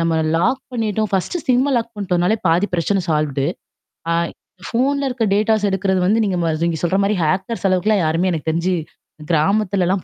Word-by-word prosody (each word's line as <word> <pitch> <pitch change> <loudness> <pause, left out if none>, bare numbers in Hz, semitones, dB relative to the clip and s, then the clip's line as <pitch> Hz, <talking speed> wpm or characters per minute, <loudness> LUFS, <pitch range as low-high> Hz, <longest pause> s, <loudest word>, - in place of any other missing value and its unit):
நம்ம 165 -1 +1 0.2
லாக் 225 +11 +1
பண்ணிட்டோம் 220 -3 -1
ஃபஸ்டு 195 - -1
சிம்ம 260 +3 +3
லாக் 230 0 -2
பண்ணிட்டோம்னாலே 185 0 +1
பாதி 170 +5 +3
பிரச்சனை 190 +3 +1
சால்வடு. 150 -3 0 0.7
ஆ - - +3 0.5
ஃபோன்ல 275 +4 0
இருக்க 250 -2 -2
டேட்டாஸ் 215 0 +2
எடுக்குறது 190 -1 0
வந்து 215 +4 +3
நீங்க 190 -3 -1
ம 165 - +1
நீங்க 170 -1 -1
சொல்ற 175 +2 +1
மாரி 205 +1 +1
ஹேக்கர்ஸ் 190 +7 -1
அளவுக்குலாம் 185 +1 +2
யாருமே 165 +4 +1
எனக்கு 160 -1 -2
தெரிஞ்சு 170 +3 0 0.6
கிராமத்துலலாம் 190 +2 +1
190 Hz, 160 wpm, -19 LUFS, 170-220 Hz, 0.7 s, சிம்ம